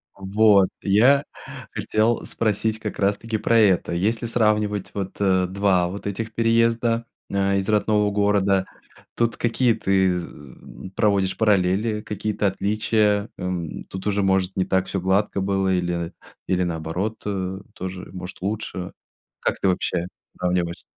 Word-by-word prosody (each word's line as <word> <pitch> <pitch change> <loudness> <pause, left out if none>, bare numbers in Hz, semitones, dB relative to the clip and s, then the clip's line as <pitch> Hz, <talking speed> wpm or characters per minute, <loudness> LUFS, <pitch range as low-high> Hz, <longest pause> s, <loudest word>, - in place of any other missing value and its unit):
Вот. 100 0 +4
Я 125 +9 +4 0.5
хотел 110 +2 0
спросить 110 0 0
как 105 -1 -5
раз 100 +1 +2
таки 115 0 -3
про 115 +2 +2
это. 100 -7 +3
Если 110 +7 0
сравнивать 105 -3 +1
вот, 95 -2 -4
э, 95 -2 +2
два 95 -2 +2
вот 100 +3 -7
этих 110 +2 -4
переезда, 115 0 +2 0.3
э, 100 0 +1
из 95 0 -2
родного 105 -1 +2
города, 100 -2 +2 0.5
тут 115 -1 0
какие 120 0 +2
ты 95 -3 +1
з 85 - -5 0.6
э, - - -6
проводишь 100 -3 +2
параллели, 105 +1 +2
какие-то 105 -1 -2
отличия? 105 +1 +1
Эм, 90 -3 -4
тут 95 0 -8
уже, 100 0 +1
может, 95 -1 +1
не 95 - +1
так 95 -1 +1
всё 95 - -2
гладко 100 +2 +1
было 95 -1 +1
или, 85 -2 -1
э, - - -13 0.4
или 90 -1 +1
наоборот, 85 +6 -3
э, 95 -2 -3
тоже, 95 0 -7
может, 90 0 -8
лучше. 95 -2 -4 0.5
Как - - -1
ты - - +1
вообще 90 -1 0 0.3
сравниваешь? 90 -1 -1
100 Hz, 145 wpm, -23 LUFS, 95-110 Hz, 0.6 s, Вот